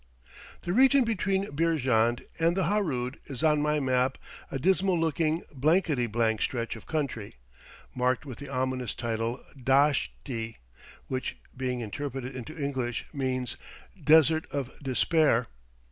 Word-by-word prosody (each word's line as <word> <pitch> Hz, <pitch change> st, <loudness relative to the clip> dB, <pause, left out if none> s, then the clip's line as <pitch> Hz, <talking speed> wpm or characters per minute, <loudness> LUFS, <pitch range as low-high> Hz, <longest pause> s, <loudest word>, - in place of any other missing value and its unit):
The 175 Hz, -, -1 dB
region 265 Hz, +3 st, +6 dB
between 195 Hz, -4 st, 0 dB
Beerjand 130 Hz, -8 st, +2 dB, 0.2 s
and 165 Hz, +2 st, +2 dB
the 190 Hz, -, +2 dB
Harood 150 Hz, -10 st, 0 dB
is 135 Hz, 0 st, -6 dB
on 150 Hz, -2 st, +4 dB
my 150 Hz, 0 st, +2 dB
map 130 Hz, -1 st, +1 dB, 0.3 s
a -, -, -3 dB
dismal 185 Hz, +4 st, +2 dB
looking, 160 Hz, 0 st, +1 dB
blankety 150 Hz, -2 st, +2 dB
blank 110 Hz, -1 st, +1 dB
stretch 120 Hz, -2 st, -1 dB
of 115 Hz, -, -12 dB
country, 135 Hz, -, -3 dB, 0.6 s
marked 125 Hz, +2 st, +1 dB
with 130 Hz, -5 st, -8 dB
the 140 Hz, -, -8 dB
ominous 130 Hz, -3 st, -2 dB
title 115 Hz, +1 st, -2 dB
"Dasht 135 Hz, +2 st, +3 dB, 0.2 s
i" 115 Hz, -3 st, -4 dB, 0.5 s
which, 130 Hz, 0 st, -3 dB, 0.2 s
being 125 Hz, -1 st, -2 dB
interpreted 130 Hz, +3 st, -5 dB
into 130 Hz, +6 st, -7 dB
English, 130 Hz, -5 st, -2 dB
means 130 Hz, -3 st, -2 dB, 0.5 s
Desert 160 Hz, +1 st, +5 dB
of 140 Hz, -3 st, -3 dB
Despair. 140 Hz, -2 st, +2 dB
135 Hz, 130 wpm, -28 LUFS, 125-160 Hz, 0.6 s, region